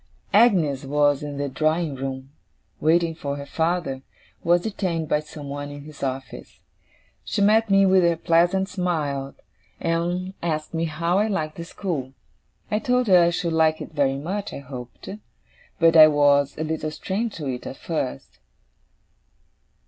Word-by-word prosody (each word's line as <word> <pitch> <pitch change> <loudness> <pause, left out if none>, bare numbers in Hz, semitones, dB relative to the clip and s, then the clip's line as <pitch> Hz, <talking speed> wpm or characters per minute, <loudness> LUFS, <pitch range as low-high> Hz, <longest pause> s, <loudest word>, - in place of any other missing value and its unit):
Agnes 180 - +4
was 145 0 +2
in 145 -1 -6
the 145 0 -2
drawing 155 +2 0
room, 135 0 -6 0.5
waiting 165 +1 +2
for 140 -3 -4
her 140 - -7
father, 160 -3 -1 0.4
who - - -7
was 175 0 +5
detained 180 -6 -2
by 150 - +2
someone 145 -2 -7
in 145 0 -9
his 150 -1 -13
office. 135 0 -5 0.6
She - - -3
met 215 +2 +4
me 195 0 +5
with 190 0 +5
her 170 -1 +2
pleasant 175 +4 +2
smile, 150 -8 -2 0.4
and 175 +3 -1
asked 155 -2 -3
me 165 0 0
how 170 +4 0
I 210 - +2
liked 155 -7 -2
the 170 - -6
school. 155 -8 -4 0.6
I 210 - +1
told 250 +2 +1
her 180 -2 +7
I 170 - +4
should 170 -1 -2
like 160 -1 +3
it - - -8
very 135 -2 +1
much, 195 +8 -4
I - - -6
hoped; 125 -3 -10 0.7
but 165 -1 +4
I 155 -1 +10
was 145 -1 +3
a 155 - -2
little 155 0 -2
strange 200 +8 -3
to 155 - -6
it 125 -2 -4
at - - -7
first. 65 - -4
160 Hz, 165 wpm, -23 LUFS, 145-180 Hz, 0.7 s, I